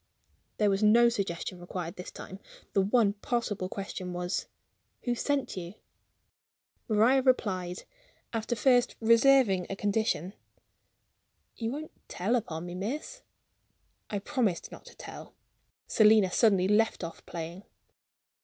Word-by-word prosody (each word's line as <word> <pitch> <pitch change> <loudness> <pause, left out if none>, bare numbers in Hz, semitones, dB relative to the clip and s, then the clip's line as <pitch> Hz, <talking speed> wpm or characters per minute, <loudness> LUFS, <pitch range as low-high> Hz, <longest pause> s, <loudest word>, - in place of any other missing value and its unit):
There 210 -2 +3
was 195 +1 0
no 235 +3 +6
suggestion 190 -5 -3
required 175 -1 -6
this 180 - -7
time. 190 - -10 0.3
The 195 - +4
one 205 +1 +3
possible 205 -3 -2
question 190 -2 -5
was: 180 +1 -2 0.6
"Who 245 - 0
sent 280 +2 -1
you?" 180 +1 -7 1.1
Maria 230 +5 +4
replied, 185 -9 0 0.5
after 225 +1 -1
first 245 +2 +3
reserving 230 -5 +4
a 195 - -3
condition: 200 -3 -1 1.2
"You 225 -1 -3
won't 300 +3 -6 0.2
tell 200 +7 0
upon 175 -8 -3
me, 175 - -6
miss?" 275 - -5 0.9
I 205 - -2
promised 215 -4 -1
not - - -12
to - - -14
tell. - - -10 0.5
Selina 215 -3 +5
suddenly 195 -3 +3
left 210 -1 +2
off 165 -1 -7
playing. 170 +2 -6
205 Hz, 125 wpm, -29 LUFS, 185-235 Hz, 1.2 s, no